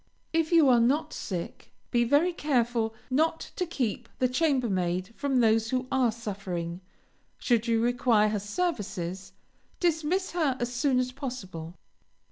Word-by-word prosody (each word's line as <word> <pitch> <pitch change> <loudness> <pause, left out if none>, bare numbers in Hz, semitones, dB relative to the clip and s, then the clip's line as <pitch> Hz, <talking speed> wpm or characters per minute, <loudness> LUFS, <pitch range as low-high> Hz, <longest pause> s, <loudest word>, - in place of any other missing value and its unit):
If 325 0 +1
you 330 -4 +6
are 245 -2 +6
not 295 +7 +1
sick, 175 -4 -6 0.2
be 240 0 +3
very 290 +9 +3
careful 240 -7 0 0.2
not 320 +5 +1
to 360 - -1
keep 240 -7 -2
the 255 - +2
chambermaid 225 - 0
from 280 -2 -1
those 225 0 +3
who 255 0 0
are 255 -3 +3
suffering; 190 -6 -5 0.6
should 235 -2 +1
you 230 -1 +2
require 235 -2 +3
her 210 -1 -1
services, 195 - -3 0.5
dismiss 345 +2 0
her 310 -7 0
as 240 +1 -2
soon 260 +1 +2
as 255 0 0
possible. 190 - -7
245 Hz, 140 wpm, -28 LUFS, 210-285 Hz, 0.6 s, you